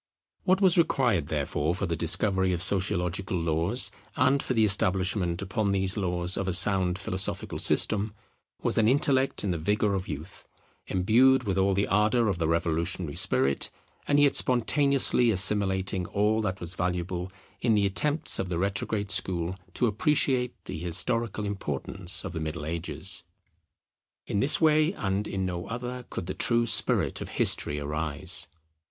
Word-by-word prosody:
What 185 +1 +2
was 180 -3 +6
required 120 - +1
therefore 75 +2 -2
for 95 - -3
the 85 -2 -2
discovery 95 +3 +1
of 85 +1 -2
Sociological 95 -1 -2
laws, 85 +8 +1 0.2
and 130 +2 +2
for 130 - -3
the 110 -1 +3
establishment 95 -2 0
upon 100 +2 -2
these 95 0 +1
laws 90 -2 +1
of 95 - -3
a 95 - 0
sound 90 -1 +4
philosophical 95 -1 -2
system, 105 0 +3 0.5
was - - +2
an 110 - +3
intellect 135 +1 +2
in 100 - -1
the 85 - -3
vigour 105 +4 0
of 95 -1 -3
youth, 80 +7 -8 0.4
imbued 120 +8 +3
with 95 -3 -1
all 95 0 +2
the 100 +1 +1
ardour 105 +3 +2
of 90 -3 -2
the 80 - 0
revolutionary 85 0 -1
spirit, 65 +1 +1 0.4
and 145 0 +3
yet 145 -1 +4
spontaneously 130 0 +3
assimilating 95 -2 +2
all 105 +2 0
that 95 -3 -3
was 85 0 -6
valuable 90 0 -3 0.3
in 115 -3 +2
the 100 -1 +2
attempts 150 +10 +1
of 95 - -3
the 85 - -2
retrograde 100 +2 -2
school 90 -3 0 0.2
to 125 - +1
appreciate 125 +2 0
the - - -6
historical 105 +6 -2
importance 95 -1 -4
of - - -6
the 80 - -4
Middle 80 -1 -5
Ages. 85 +2 -4 1.0
In 100 - -2
this 135 +7 +4
way 155 +1 +3
and 100 - -3
in 95 -1 -3
no 90 -1 -5
other 125 +1 -6
could - - -5
the 95 - -4
true 120 0 +1
spirit - - +2
of - - -6
history 75 - +2
arise. 75 0 -2
95 Hz, 160 wpm, -27 LUFS, 90-110 Hz, 1.0 s, was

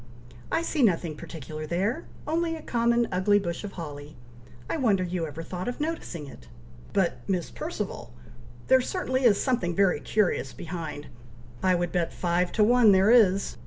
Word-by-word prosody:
"I 330 - +1
see 320 -3 -1
nothing 170 -8 +2
particular 155 0 -7
there! 200 - -1 0.2
only 330 +1 0
a 320 - -9
common 235 0 +2
ugly 190 +3 +3
bush 175 -2 -3
of 205 - -6
holly! 150 -3 -8 0.5
I - - -2
wonder 210 -9 +2
you 175 -2 -2
ever 160 +2 -7
thought 180 +2 -5
of 245 - -4
noticing 295 - -4
it!" 60 - -13 0.4
"But, 190 -3 +1
Miss 180 -3 -1
Perceval! 330 +3 -5 0.6
there 260 0 +6
certainly 260 -4 -1
is 205 -4 +5
something 235 -10 0
very 195 -5 +3
curious 185 -8 0
behind! 160 -4 -6 0.6
I 185 -1 +3
would 175 -1 -1
bet 175 -2 0
five 175 0 0
to 215 - +3
one 230 -2 +6
there 190 +3 +5
is!" 200 -5 +4
190 Hz, 165 wpm, -27 LUFS, 170-240 Hz, 0.6 s, there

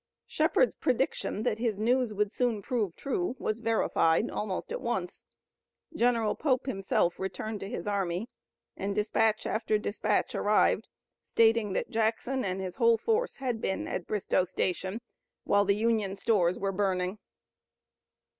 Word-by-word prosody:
Shepard's - - +2
prediction 215 - -1
that 215 - 0
his 225 -4 0
news 240 +2 +2
would 210 0 0
soon 230 -5 0
prove 215 -8 -1
true 355 +2 -2
was 215 -2 -2
verified 225 -4 +2
almost 210 - -3
at - - -3
once. - - -3 0.7
General 235 -5 +2
Pope 260 -5 0
himself 195 -7 0
returned 200 +3 -4
to 195 - -6
his - - -5
army 195 0 -1 0.5
and 200 +1 -3
dispatch 215 +1 +1
after 215 -1 0
dispatch 210 0 -1
arrived 210 +1 +2 0.3
stating 225 -3 +2
that - - -2
Jackson 230 +4 0
and 185 -1 -2
his 185 -2 -5
whole 230 -1 +5
force 450 - 0
had 250 -4 -3
been 190 - -2
at 175 - -4
Bristoe 200 -3 +1
Station 185 +4 -2 0.4
while 205 0 +3
the 200 0 +3
Union 215 -3 +1
stores 185 -5 +2
were 195 0 -1
burning. 190 0 -1
215 Hz, 145 wpm, -29 LUFS, 195-230 Hz, 0.7 s, whole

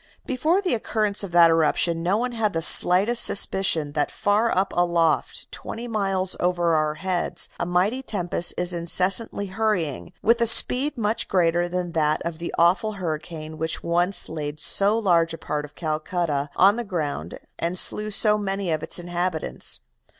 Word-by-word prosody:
Before 315 +9 0
the 365 - 0
occurrence 215 -3 0
of 195 - -6
that 170 -1 +6
eruption, 165 +1 +1
no 180 +4 +1
one 250 +2 -2
had 225 -3 -1
the 165 - -2
slightest 195 +9 +5
suspicion 180 -7 +2
that 145 0 -1
far 210 +3 0
up 190 -1 -1
aloft, 170 -3 0
twenty 235 +2 -7
miles 195 -4 -1
over 175 -1 0
our 155 -1 0
heads, 175 -1 -3
a - - -2
mighty 190 +9 0
tempest 175 -7 -1
is 180 0 0
incessantly 185 +5 +1
hurrying, 190 - -2
with 230 +2 +3
a 235 - +2
speed 265 +5 +5
much 225 0 -1
greater 175 -1 +1
than 180 -1 -3
that 155 -1 0
of 170 -1 -5
the 170 - -5
awful 185 +6 +2
hurricane 155 -3 -6
which 160 0 -3
once 175 +3 -1
laid 150 -1 -6
so 200 +6 +3
large 170 -6 +1
a - - -12
part 150 -2 -4
of 150 - -17
Calcutta 155 -2 -2
on 200 +4 +4
the 240 - -3
ground 150 - -4 0.2
and 170 +2 -2
slew 210 +3 +1
so 210 0 +2
many 195 -3 -3
of 155 -1 -1
its 160 - -1
inhabitants. 175 -1 -3
180 Hz, 170 wpm, -23 LUFS, 165-210 Hz, 0.2 s, that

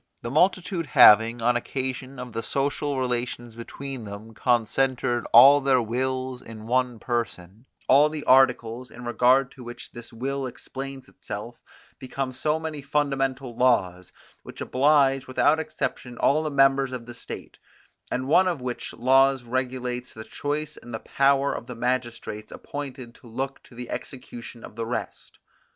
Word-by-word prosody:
The 120 - -4
multitude 180 +1 +1
having, 115 -3 +6
on 120 +1 +3
occasion 130 +2 -4
of 125 -2 -7
the 115 - -2
social 140 +2 -1
relations 120 -2 -2
between 130 +2 -7
them, 105 +2 -9
concentered 120 +1 +1
all 140 +5 +9
their 135 -1 +3
wills 130 +2 -2
in 110 -1 -10
one 125 0 0
person, 115 -2 -4 0.2
all 145 +3 +6
the 150 -1 -5
articles, 125 -2 +3
in 120 0 -11
regard 125 +2 +3
to 130 - -12
which 120 0 -9
this 120 0 -10
will 135 +3 -3
explains 135 +1 -8
itself, - - -8 0.4
become 130 0 -4
so 150 +5 0
many 160 -2 -5
fundamental 135 -3 -1
laws, 95 -8 +1 0.3
which - - -12
oblige 135 -1 +3
without 145 +4 +3
exception 155 -5 -4
all 150 +3 +3
the 155 - -2
members 135 -1 +3
of 125 -2 -6
the 120 - -9
state, 120 - -9 0.5
and 130 +1 -2
one 185 +6 +5
of 175 -5 -1
which 125 -1 -5
laws 135 +1 +3
regulates 125 0 -3
the 110 - -8
choice 150 +5 -4
and 120 -1 -8
the - - -4
power 140 +2 +2
of 120 - -6
the 125 - -7
magistrates 120 -3 -3
appointed 135 -4 -7
to 125 - -17
look 130 +4 -4
to 120 - -18
the 125 0 -7
execution 120 -2 -8
of - - -11
the 115 0 -3
rest. 115 -1 -6
130 Hz, 155 wpm, -25 LUFS, 120-135 Hz, 0.5 s, all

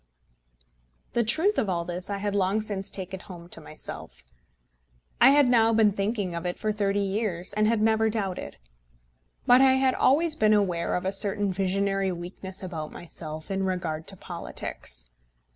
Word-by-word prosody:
The 235 - +2
truth 320 - +2
of 210 - 0
all 170 -2 -1
this 180 +2 -5
I 200 - -2
had 205 0 -2
long 195 +2 +2
since 205 -3 -3
taken 190 0 -5
home 175 -2 -11
to 165 - -6
myself. 155 - -8 1.0
I 265 - +9
had 285 -1 +5
now 230 -2 +4
been 220 -2 +4
thinking 200 -2 -2
of 170 0 -4
it 180 0 -3
for 215 - -1
thirty 205 -1 0
years, 195 -3 -1
and 215 +1 +2
had 220 -1 +2
never 220 0 +3
doubted. 195 - -3 0.9
But 250 +1 +6
I 265 -1 +6
had 265 0 +3
always 310 +4 +3
been 215 -6 +3
aware 180 -5 0
of 180 - -2
a 190 - +1
certain 200 -1 +2
visionary 195 0 0
weakness 180 +2 -6
about 160 -4 -5
myself 155 -1 -8
in 195 0 -1
regard 170 -4 -3
to 195 - -8
politics. - - -4
195 Hz, 170 wpm, -26 LUFS, 180-215 Hz, 1.0 s, I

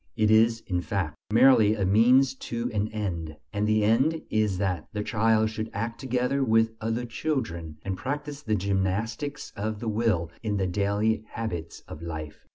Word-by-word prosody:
It 110 0 +3
is, 115 +1 +4
in 90 -2 -1
fact, 85 -2 -2 0.2
merely 115 -3 +6
a 100 -3 0
means 125 +7 +5 0.2
to 120 +1 -2
an 105 0 0
end: 85 -8 -4 0.2
and 105 0 0
the 110 0 +3
end 130 +10 +2
is 105 -3 +1
that 90 -5 -1
the 105 -1 -2
child 110 0 +2
should 110 0 -4
act 115 +3 -3
together 130 +1 0
with 115 -2 +3
other 115 +2 -1
children, 115 - -3
and 95 -1 -2
practise 145 +5 -4
the 110 -6 0
gymnastics 100 +9 -2
of 105 +1 -3
the 115 - -5
will 105 -7 0
in 105 -3 -1
the 95 - 0
daily 100 +4 0
habits 90 -8 -5
of 80 - -9
life. 75 -2 -7
110 Hz, 170 wpm, -27 LUFS, 95-115 Hz, 0.2 s, merely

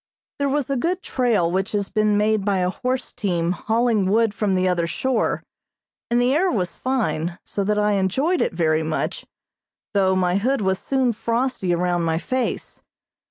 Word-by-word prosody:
There 280 0 +1
was 280 -1 -1
a 275 - +1
good 360 +2 -1
trail 230 -10 +1
which 190 +3 -1
has 200 -1 -1
been 215 -1 +2
made 210 0 +2
by 200 -1 +1
a 180 0 +1
horse 255 +4 -3
team 175 -7 -1
hauling 220 0 +1
wood 220 +1 +3
from 200 -2 0
the 185 0 +2
other 175 -2 +1
shore, 260 +8 -1 0.7
and 240 +1 +2
the 245 +2 +3
air 360 +6 +2
was 180 - -1
fine, 195 -10 -1
so 200 - -2
that 210 +1 0
I 210 0 +2
enjoyed 235 - +1
it - - +1
very 160 -2 +1
much, 160 0 -3 0.7
though 190 -2 +3
my 180 0 +2
hood 255 +5 0
was 190 -1 0
soon 260 -3 +1
frosty 230 -4 -1
around 175 0 +1
my 165 -1 0
face. 255 +8 -3
210 Hz, 180 wpm, -22 LUFS, 185-250 Hz, 0.7 s, wood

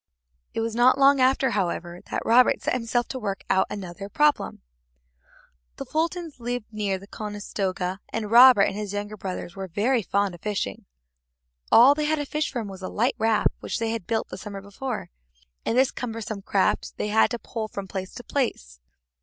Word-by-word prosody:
It - - 0
was 225 0 -2
not 245 +3 +5
long 275 0 +5
after, 260 0 +3
however, 175 -3 -2
that - - -3
Robert 245 +2 +5
set - - -1
himself 240 0 0
to 260 - -4
work 200 -4 -4
out 190 0 +3
another 195 0 -7
problem. 295 - +1 1.1
The - - -6
Fultons 330 -1 -2
lived 245 -1 -3
near 205 -3 -1
the 195 - -12
Conestoga, 200 -3 -4
and 220 -2 -4
Robert 245 -3 +9
and - - 0
his 205 -1 -4
younger 205 +1 -4
brothers 185 -3 -6
were 195 -1 -5
very 225 +8 +1
fond 200 -1 0
of 175 - -12
fishing. 200 - -3 0.9
All 250 +5 +8
they 300 +1 -2
had 310 +1 +2
to 290 - -2
fish 300 +2 -2
from 235 -5 -3
was 190 -1 -9
a 185 - -4
light 240 +5 +1
raft 225 -1 +2
which - - -3
they 225 -1 -1
had 225 -6 -4
built 225 -1 -1
the - - -7
summer 200 -2 -7
before, 205 - -6 0.6
and 230 - +1
this 260 0 +4
cumbersome 225 -4 -5
craft 195 0 0
they 210 - -2
had 220 +1 +4
to 240 - -3
pole 225 -1 -5
from 200 -2 -6
place 190 0 -5
to 245 - -8
place. 65 - -2
215 Hz, 190 wpm, -25 LUFS, 195-250 Hz, 1.1 s, Robert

